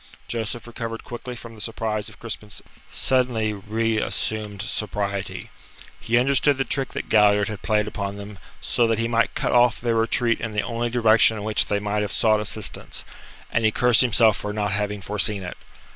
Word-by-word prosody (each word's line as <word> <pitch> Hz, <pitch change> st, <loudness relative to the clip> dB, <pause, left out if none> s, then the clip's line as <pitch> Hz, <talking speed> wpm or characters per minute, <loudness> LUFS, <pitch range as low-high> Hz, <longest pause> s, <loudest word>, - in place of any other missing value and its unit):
Joseph 115 Hz, 0 st, -4 dB
recovered 115 Hz, -1 st, -6 dB
quickly 120 Hz, +1 st, -7 dB
from 115 Hz, -1 st, -10 dB
the 110 Hz, -, -11 dB
surprise 110 Hz, -1 st, -3 dB
of 105 Hz, -, -16 dB
Crispin's 110 Hz, -2 st, -7 dB, 0.3 s
suddenly 125 Hz, -5 st, +1 dB
reassumed 110 Hz, -1 st, -1 dB
sobriety. 100 Hz, -3 st, -3 dB, 0.5 s
He 120 Hz, -, +1 dB
understood 140 Hz, +2 st, +3 dB
the 135 Hz, -, +1 dB
trick 135 Hz, -1 st, -1 dB
that -, -, -4 dB
Galliard 105 Hz, -1 st, +4 dB
had 105 Hz, -3 st, -6 dB
played 105 Hz, -1 st, +1 dB
upon 100 Hz, -1 st, -4 dB
them 100 Hz, -1 st, -9 dB, 0.2 s
so 120 Hz, -, +1 dB
that 115 Hz, -1 st, +1 dB
he 115 Hz, +1 st, 0 dB
might 115 Hz, 0 st, +1 dB
cut -, -, 0 dB
off 120 Hz, -1 st, +4 dB
their 120 Hz, -1 st, 0 dB
retreat 115 Hz, +1 st, +1 dB
in 110 Hz, -1 st, -4 dB
the 105 Hz, -, 0 dB
only 120 Hz, 0 st, -2 dB
direction 115 Hz, -2 st, +4 dB
in 105 Hz, -, -5 dB
which 110 Hz, 0 st, +1 dB
they 105 Hz, -, +1 dB
might 105 Hz, +1 st, -1 dB
have 105 Hz, -, -2 dB
sought 110 Hz, -1 st, +3 dB
assistance, 105 Hz, 0 st, -3 dB, 0.5 s
and 115 Hz, -, +1 dB
he 110 Hz, -, +5 dB
cursed 120 Hz, +1 st, +4 dB
himself 115 Hz, -4 st, +5 dB
for 105 Hz, -, -4 dB
not 105 Hz, -1 st, -1 dB
having 105 Hz, 0 st, -2 dB
foreseen 105 Hz, 0 st, -1 dB
it. 90 Hz, -, -6 dB
110 Hz, 185 wpm, -23 LUFS, 105-115 Hz, 0.5 s, he